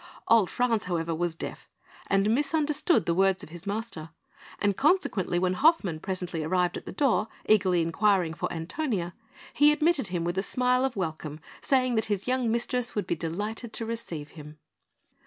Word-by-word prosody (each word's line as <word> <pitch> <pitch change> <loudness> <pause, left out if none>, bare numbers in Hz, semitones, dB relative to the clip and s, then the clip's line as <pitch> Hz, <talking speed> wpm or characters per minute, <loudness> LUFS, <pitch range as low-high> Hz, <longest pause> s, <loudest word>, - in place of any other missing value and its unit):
Old 225 -6 +5
Franz, 235 -3 0
however, 170 -2 -1
was 170 0 -1
deaf, - - -7 0.4
and 195 +2 +2
misunderstood 300 +4 +2
the 170 - +1
words 190 +1 +2
of - - -10
his 175 +4 -10
master; 200 -6 -4 0.5
and, 205 -1 +1
consequently, 270 - +1
when 180 +1 +1
Hoffmann 205 - +3
presently 180 -3 -3
arrived 180 +2 +1
at - - -7
the - - -4
door, 260 -6 +2 0.2
eagerly 185 -5 +4
inquiring 180 0 +2
for - - -3
Antonia, 175 - -3 0.4
he 295 +1 +6
admitted 300 - +2
him 175 -2 -2
with 175 +2 -1
a - - +2
smile 250 +5 +1
of 265 - -2
welcome, 155 -5 -4 0.2
saying 255 -2 +2
that 220 -2 +1
his 205 0 -2
young 255 -2 +1
mistress 240 +1 -1
would 210 - -1
be - - -1
delighted 205 +8 -4
to 225 - -2
receive 175 -10 -5
him. 150 -1 -11
200 Hz, 175 wpm, -27 LUFS, 175-250 Hz, 0.5 s, he